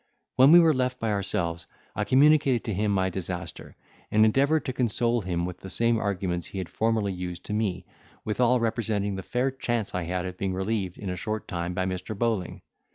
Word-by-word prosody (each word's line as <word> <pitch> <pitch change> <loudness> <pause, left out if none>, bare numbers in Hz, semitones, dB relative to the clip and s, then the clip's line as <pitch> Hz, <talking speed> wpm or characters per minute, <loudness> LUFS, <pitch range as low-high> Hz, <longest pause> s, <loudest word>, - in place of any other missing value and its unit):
When 130 +3 +7
we 175 - +10
were 165 -2 +5
left 125 -1 -1
by 115 -1 -1
ourselves, 85 -4 -2 0.3
I 105 - -1
communicated 140 -2 +4
to 110 - -3
him 105 +2 0
my 95 -1 +1
disaster, 90 -2 -6 0.3
and 110 +1 +5
endeavoured 140 +8 +2
to 130 - -2
console 120 0 +1
him 90 -2 -2
with 90 -1 -6
the 95 - -9
same 115 +3 +2
arguments 95 -4 -2
he - - -8
had 95 -2 -4
formerly 110 -3 0
used 90 -1 -6
to - - -4
me, 95 -4 -1 0.4
withal 125 +3 +2
representing 110 -3 -1
the 95 - -4
fair 125 +7 -1
chance 120 -5 -2
I 90 -1 -2
had 90 +1 -2
of 90 0 -7
being 95 -1 -1
relieved 95 -1 -2
in 95 -3 -4
a - - -3
short 110 +4 -4
time 85 0 -3
by 95 - 0
Mr. 95 +3 -4
Bowling. 110 -5 -1
105 Hz, 205 wpm, -26 LUFS, 90-120 Hz, 0.4 s, we